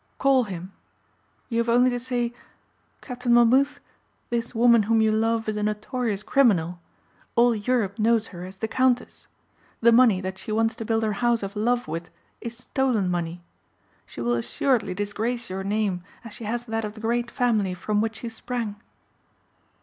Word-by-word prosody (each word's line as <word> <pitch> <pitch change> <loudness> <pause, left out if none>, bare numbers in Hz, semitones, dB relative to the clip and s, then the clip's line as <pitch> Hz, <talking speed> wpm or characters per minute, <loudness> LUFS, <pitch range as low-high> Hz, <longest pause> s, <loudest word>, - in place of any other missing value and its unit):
Call 270 -3 +3
him. 185 -1 -7 0.7
You 230 -1 -1
have 235 0 0
only 245 +2 +4
to 245 - -2
say, 240 -1 -2 0.7
'Captain 250 -2 -3
Monmouth, 255 +4 +4 0.5
this 235 0 -2
woman 235 0 +6
whom 225 -1 +4
you 220 0 +3
love 225 +1 +1
is 215 -1 -1
a - - -1
notorious 210 0 -2
criminal. 180 -12 +2 0.6
All 240 0 +5
Europe 215 -2 -1
knows 225 0 +3
her 175 0 -7
as 190 +1 -9
the 220 - -2
Countess. 255 +1 0 0.5
The 235 0 +5
money 230 -5 +5
that 190 0 -5
she - - -7
wants 225 +2 +1
to 225 - -5
build 225 0 +1
her 215 -1 0
house 240 -2 +2
of 195 +1 -5
love 240 +3 0
with 165 +2 -5 0.3
is 235 0 -6
stolen 245 -7 0
money. 175 0 -3 0.6
She - - -8
will 120 +1 +1
assuredly 195 - 0
disgrace 215 +3 -3
your 190 +1 -3
name 200 -3 -1 0.2
as 225 - -8
she 225 - -8
has 235 +3 -2
that 225 -1 -2
of 210 0 -5
the - - -10
great 235 +2 -1
family 215 -8 +1
from 210 +3 0
which 225 0 -2
she 235 - -5
sprang. 225 -2 -4
225 Hz, 175 wpm, -25 LUFS, 205-240 Hz, 0.7 s, woman